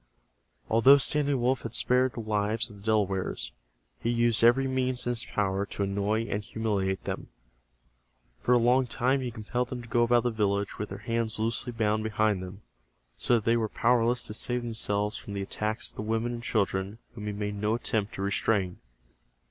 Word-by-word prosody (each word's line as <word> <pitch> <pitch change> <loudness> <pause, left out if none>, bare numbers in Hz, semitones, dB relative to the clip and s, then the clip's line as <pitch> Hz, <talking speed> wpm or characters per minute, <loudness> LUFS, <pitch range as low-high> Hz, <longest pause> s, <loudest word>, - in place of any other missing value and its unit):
Although 130 +5 +7
Standing 145 -1 +2
Wolf 125 +1 +1
had 115 - -5
spared 125 0 +2
the 115 - -5
lives 110 +1 0
of 105 - -12
the - - -14
Delawares, 100 - 0 0.5
he 115 - -1
used 120 -1 +3
every 125 +3 +5
means 130 -1 -1
in 120 - +1
his 120 -1 -3
power 100 -1 0
to 100 - -3
annoy 100 +3 0
and 105 -2 -3
humiliate 100 -4 -1
them. - - -4 1.1
For 125 - +1
a - - +6
long 125 +2 +3
time 130 +3 +1
he 125 - -2
compelled 120 +2 -3
them 125 -2 -5
to - - -12
go 120 +1 +2
about 120 0 +4
the 120 - +1
village 100 -2 -1
with 105 - -3
their - - -6
hands 115 -1 -1
loosely 115 +3 -1
bound 110 -2 0
behind 110 -2 +1
them, 95 +3 -9 0.6
so 120 - +3
that 110 - -1
they 115 +1 +4
were 110 -2 -1
powerless 120 +1 +2
to - - -6
save 125 +2 -2
themselves 105 -2 -1
from 100 - -8
the 100 -1 -2
attacks 110 +3 -3
of - - -24
the - - -3
women 115 +2 -1
and 120 - -5
children 100 -3 -1 0.2
whom 105 -3 -7
he - - -1
made 105 0 -3
no 105 +2 0
attempt 110 -3 -1
to 95 - -4
restrain. 100 -1 0
110 Hz, 195 wpm, -28 LUFS, 105-120 Hz, 1.1 s, Although